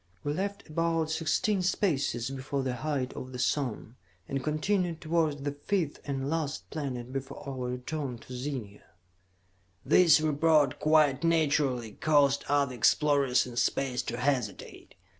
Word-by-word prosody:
"We 145 - -1
left 200 +4 -4
about 165 0 0
sixteen 190 +6 +1
spaces 140 - 0
before 135 +1 -3
the 125 -1 -2
height 140 -2 -2
of 130 - -7
the - - -5
sun, 125 -2 -2 0.3
and 135 -1 -3
continued 165 +3 0
towards 155 -3 0
the 145 - -1
fifth 155 +2 -2
and 135 -1 -3
last 155 -1 -2
planet 130 -5 -4
before 135 0 -6
our 130 -2 -4
return 125 +1 -4
to 125 - -12
Zenia." 125 -6 -5 1.0
This 160 +2 +6
report, 155 -2 +2
quite 155 -2 +3
naturally, 145 -8 +1
caused 140 -1 +2
other 140 -2 +2
explorers 140 +2 +3
in 125 -1 -9
space 130 0 0
to 120 - -4
hesitate. 125 -5 -3
145 Hz, 140 wpm, -29 LUFS, 130-155 Hz, 1.0 s, This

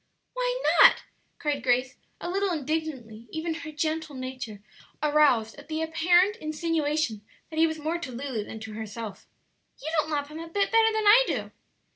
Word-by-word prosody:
"Why - - -1 0.2
not?" - - +7 0.3
cried 295 -3 -1
Grace, 255 +1 +1 0.2
a - - -5
little 390 +2 0
indignantly, 280 -8 -3
even 320 +1 -3
her 320 -1 -7
gentle 310 0 -2
nature 255 -5 -6 0.4
aroused 290 -7 +3
at - - -14
the 315 0 -2
apparent 350 +6 +3
insinuation 310 - -1 0.3
that 315 - -3
he 325 - +6
was 315 0 -3
more 315 +3 -2
to 300 -7 -6
Lulu 245 -3 -4
than 220 - -8
to 220 -1 -7
herself; 220 0 -7 0.5
"you 315 - -5
don't 305 - 0
love 290 -2 -2
him 310 +1 -8
a 330 - -7
bit 395 +4 0
better 450 -1 +5
than 435 -1 -1
I 440 +5 +8
do." - - -2
310 Hz, 175 wpm, -27 LUFS, 255-330 Hz, 0.5 s, I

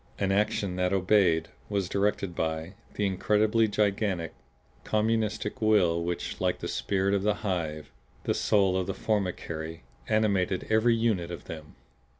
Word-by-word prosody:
An 95 -1 0
action 100 -2 0
that 90 0 +1
obeyed, 90 -4 +3 0.2
was 100 -3 0
directed 100 -2 0
by, 80 +2 -2 0.2
the 105 - 0
incredibly 105 +3 +2
gigantic, 100 -5 0 0.5
communistic 110 -1 0
will 90 -6 +3
which, 85 0 -4
like - - +1
the - - -5
spirit 100 0 0
of 100 - +2
the 105 +1 +1
hive, 80 -6 -2 0.3
the - - +1
soul 95 -3 +2
of 95 -1 -1
the 95 - -3
formicary, 85 -6 -2 0.3
animated 100 -4 +1
every 115 +2 +4
unit 110 -7 0
of 85 - -7
them. 80 -1 -9
95 Hz, 145 wpm, -28 LUFS, 90-105 Hz, 0.5 s, every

